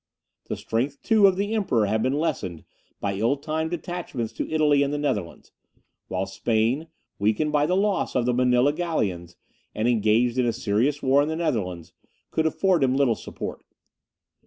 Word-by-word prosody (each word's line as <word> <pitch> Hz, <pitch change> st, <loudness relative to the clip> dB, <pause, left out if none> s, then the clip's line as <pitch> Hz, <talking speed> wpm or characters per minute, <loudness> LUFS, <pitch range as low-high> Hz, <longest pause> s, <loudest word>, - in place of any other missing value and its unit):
The -, -, -1 dB
strength, 130 Hz, +5 st, -2 dB
too, 215 Hz, -3 st, +5 dB
of 190 Hz, -, +3 dB
the 205 Hz, +3 st, -1 dB
Emperor 155 Hz, -, +1 dB
had 110 Hz, +2 st, 0 dB
been 130 Hz, +4 st, +1 dB
lessened 115 Hz, -, -2 dB, 0.4 s
by 100 Hz, -1 st, -1 dB
ill 115 Hz, +8 st, +1 dB
timed 155 Hz, +2 st, -2 dB
detachments 170 Hz, -9 st, -4 dB
to -, -, -4 dB
Italy 150 Hz, -2 st, +3 dB
and 140 Hz, 0 st, +1 dB
the 145 Hz, -, -1 dB
Netherlands; 105 Hz, -, -3 dB, 0.6 s
while 95 Hz, +1 st, -2 dB
Spain, 115 Hz, +9 st, 0 dB, 0.3 s
weakened 110 Hz, +9 st, +1 dB
by 150 Hz, 0 st, +2 dB
the 180 Hz, +2 st, +1 dB
loss 200 Hz, 0 st, 0 dB
of 125 Hz, -2 st, +2 dB
the 125 Hz, -, +2 dB
Manilla 125 Hz, +2 st, +3 dB
galleons, 95 Hz, -, -2 dB, 0.4 s
and 110 Hz, +2 st, 0 dB
engaged 115 Hz, +2 st, +2 dB
in 125 Hz, -, +2 dB
a 115 Hz, -, +1 dB
serious 120 Hz, +5 st, 0 dB
war 135 Hz, +2 st, +4 dB
in 145 Hz, -, 0 dB
the 160 Hz, -, -2 dB
Netherlands, 105 Hz, -, -2 dB, 0.4 s
could 160 Hz, 0 st, +1 dB
afford 180 Hz, -1 st, +2 dB
him 130 Hz, 0 st, +2 dB
little 135 Hz, -4 st, +3 dB
support. -, -, -7 dB
130 Hz, 175 wpm, -25 LUFS, 110-155 Hz, 0.6 s, too